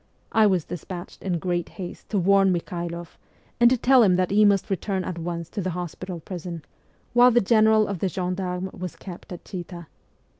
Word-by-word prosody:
I 220 -1 +5
was 185 -5 +1
despatched 175 +1 -8
in 180 -3 -1
great 175 0 -2
haste 180 -3 -8
to 210 - 0
warn 195 +1 +4
Mikhailoff, 170 -1 -4 0.4
and 240 0 +7
to 255 - +2
tell 255 +2 +5
him 190 -5 +5
that 185 0 0
he 210 +1 +5
must 200 -1 +2
return 190 0 -1
at 175 -2 -5
once 170 0 -4
to 205 - -4
the 185 - -2
hospital 180 0 -6
prison, 170 -2 -7 0.5
while 245 +1 +7
the 240 0 +4
General 220 0 +4
of 200 -3 -4
the 190 - 0
gendarmes 180 +1 -3
was 180 -1 -6
kept 180 -1 -10
at 175 - -8
Chita. 175 -2 -7
185 Hz, 190 wpm, -24 LUFS, 175-200 Hz, 0.5 s, and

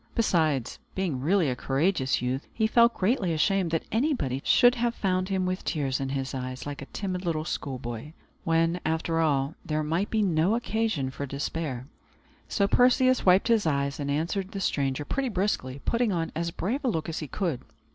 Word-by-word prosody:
Besides, 155 - +1 0.2
being 180 -9 -1
really 175 +3 +2
a 125 - 0
courageous 135 0 0
youth, 130 +3 -2
he 220 - 0
felt 235 +2 +4
greatly 190 -3 +1
ashamed 190 +3 +2
that 165 0 -1
anybody 220 - 0
should 245 -1 +5
have 240 -1 -1
found 185 -1 0
him 190 -1 0
with 185 +1 -2
tears 135 -5 -1
in 135 -1 -2
his 135 0 -3
eyes, 130 -1 -5
like 145 0 -6
a 140 - -8
timid 185 -2 -4
little 160 -3 -1
schoolboy, 130 0 -5 0.3
when, 165 +1 +2
after 160 +1 0
all, 145 -2 +1
there 155 0 -1
might 165 +7 -1
be 220 -1 +1
no 175 +2 +2
occasion 220 - -1
for 140 +1 -5
despair. 140 -2 -3 0.6
So 200 -2 +1
Perseus 255 +1 +4
wiped 185 +3 +5
his 220 -6 +3
eyes, 140 -1 0
and 140 -1 -3
answered 175 +7 -1
the 200 - -3
stranger 140 -5 -1
pretty 275 - -1
briskly, 180 - -1
putting 235 -2 +1
on 165 -3 -1
as 170 +1 -1
brave 225 - -3
a - - 0
look 165 -9 -1
as 165 - -3
he 155 - -5
could. 165 -4 -2
165 Hz, 185 wpm, -27 LUFS, 140-200 Hz, 0.6 s, should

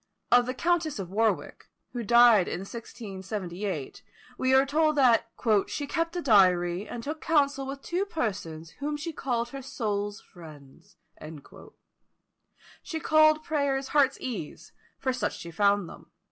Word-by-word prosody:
Of 245 0 +5
the 255 - -3
Countess 330 -1 0
of 190 -3 -6
Warwick, 220 +2 -1 0.2
who 245 - -3
died 235 -3 +6
in 175 - -4
1678, 195 - -6 0.3
we 260 +1 0
are 265 +1 +5
told 305 +2 +2
that 240 -5 +4 0.4
"she 290 - -4
kept 330 +4 -2
a 350 - -3
diary, 185 -4 +3
and 235 - -7
took 305 +4 -5
counsel 280 -3 +1
with 275 0 -7
two 360 +3 -1
persons, 190 - -4
whom 295 +1 -2
she 320 +2 -5
called 240 -4 -2
her 275 +2 -7
soul's 205 -5 -3
friends." 150 -6 -15 1.8
She 320 - -5
called 310 0 +4
prayers 280 -3 -1
heart's 275 -2 +2
ease, 225 - -6 0.3
for 260 -1 -1
such 250 - -2
she 170 -2 -9
found 200 +1 +2
them. - - -13
240 Hz, 145 wpm, -27 LUFS, 200-285 Hz, 1.8 s, died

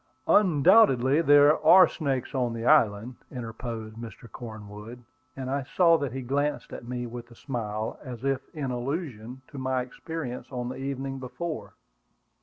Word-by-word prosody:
"Undoubtedly 160 - +5
there 145 0 +5
are 185 +4 +8
snakes 135 -5 -3
on 125 -3 0
the 115 0 -5
island," 120 -4 +3
interposed 115 -2 -6
Mr. 115 0 -9
Cornwood; 110 +1 -10 0.3
and 130 -1 -5
I 140 +1 0
saw 165 +5 +4
that 140 -4 -2
he 130 +1 -5
glanced 145 +3 -2
at 120 - -8
me, 125 0 -3
with 120 0 -8
a 120 - -15
smile, 110 -5 -4
as 125 -3 -8
if 135 -1 +1
in 140 -5 -4
allusion 125 -2 -5
to 140 - -8
my 130 -1 0
experience 130 0 -6
on 125 -1 -4
the 130 - -6
evening 135 0 -4
before. 155 +6 -6
130 Hz, 155 wpm, -27 LUFS, 120-145 Hz, 0.3 s, are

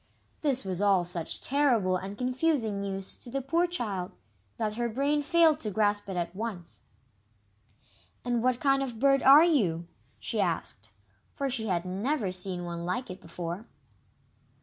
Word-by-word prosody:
This 270 -7 +1
was 185 0 -2
all 195 -3 +4
such 175 -1 -2
terrible 245 -10 +2
and 195 +2 -5
confusing 250 -4 0
news 195 -1 -3
to 245 - -8
the 275 - -2
poor 330 +7 +1
child, 205 - -3 0.5
that 215 -1 -1
her 235 +2 -1
brain 280 +5 +1
failed 320 +1 +4
to 215 - -3
grasp 205 0 0
it 190 - -3
at 170 +1 -3
once. 200 -5 -5 1.5
"And 240 -1 0
what 250 0 +1
kind 275 -1 +3
of 265 -3 -3
a - - -12
bird 275 +2 +4
are 280 +4 +8
you?" 180 - +1 0.3
she - - -1
asked, - - -1 0.4
for 275 -2 -2
she 225 -3 0
had 180 -2 0
never 205 +4 -1
seen 180 -1 -4
one 170 0 -5
like 185 +6 -3
it 185 +1 -9
before. 175 +4 -6
220 Hz, 165 wpm, -29 LUFS, 185-275 Hz, 1.5 s, are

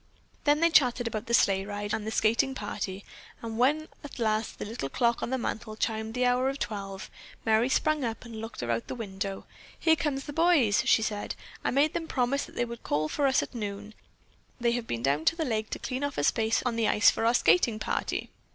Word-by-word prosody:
Then 295 +1 +4
they 335 0 +4
chattered 250 -5 +4
about 220 -1 -4
the 235 - -2
sleigh 195 -3 +3
ride 205 +1 -4
and 215 -1 -2
the - - -2
skating 230 +5 +2
party, 205 -3 -5 0.4
and 225 0 -5
when 300 +5 +2 0.2
at 290 - -9
last 220 -2 0
the - - -5
little 210 - -4
clock 235 - +1
on - - -2
the 260 - 0
mantle 220 -2 -4
chimed 220 +1 -2
the 250 0 +2
hour 250 +1 +2
of 275 - -3
twelve, 195 -6 -5 0.3
Merry 225 +3 +3
sprang 310 +1 +1
up 230 0 -4
and 225 -2 -7
looked 225 - -6
out 120 - -1
of 115 0 -2
the - - -5
window. 195 -3 -5 0.3
"Here 320 -1 +4
come 295 -2 -1
the 275 +2 -6
boys!" 310 -10 +4
she 220 - +5
said. 210 -1 -3 0.3
"I - - +1
made 290 +4 +2
them 330 -1 -3
promise 270 0 0
that - - -16
they 240 - 0
would 235 0 -8
call 155 +1 -1
for 285 - +1
us 265 - +3
at - - -9
noon. 210 -2 -5 0.7
They've 235 -1 0
been 115 0 -3
down 140 +3 +1
to - - +4
the 325 -2 -1
lake 220 -4 -1
to - - -3
clean 260 +1 -4
off 285 -1 -2
a - - 0
space 225 +7 +2
on 235 -2 0
the 225 -2 +2
ice 210 - +5
for - - -3
our 235 - +4
skating 240 -6 +4
party." - - -2
230 Hz, 230 wpm, -28 LUFS, 210-265 Hz, 0.7 s, she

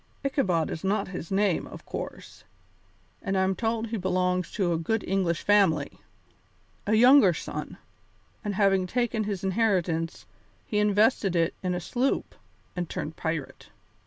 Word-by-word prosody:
Ichabod 185 - +1
is 160 - -5
not 195 +1 0
his 180 -3 -6
name, 195 -3 +1
of - - -11
course, - - -7 0.8
and 195 0 -1
I'm 190 0 +2
told 225 +1 -1
he 225 - -2
belongs 180 -1 0
to 185 -5 +1
a - - 0
good 215 +6 -1
English 180 -3 0
family 190 -8 +2 0.9
a 215 - +3
younger 245 - +7
son, - - -6 0.7
and 205 -2 -2
having 195 -2 +3
taken 230 0 0
his 200 -3 -3
inheritance, 185 -5 0 0.4
he 210 -6 -1
invested 210 -2 +3
it 165 -1 +2
in 180 -1 -1
a - - -2
sloop 245 +10 -1 0.4
and 175 -2 -3
turned 155 - -5
pirate. 160 -4 -4
190 Hz, 145 wpm, -27 LUFS, 175-215 Hz, 0.9 s, younger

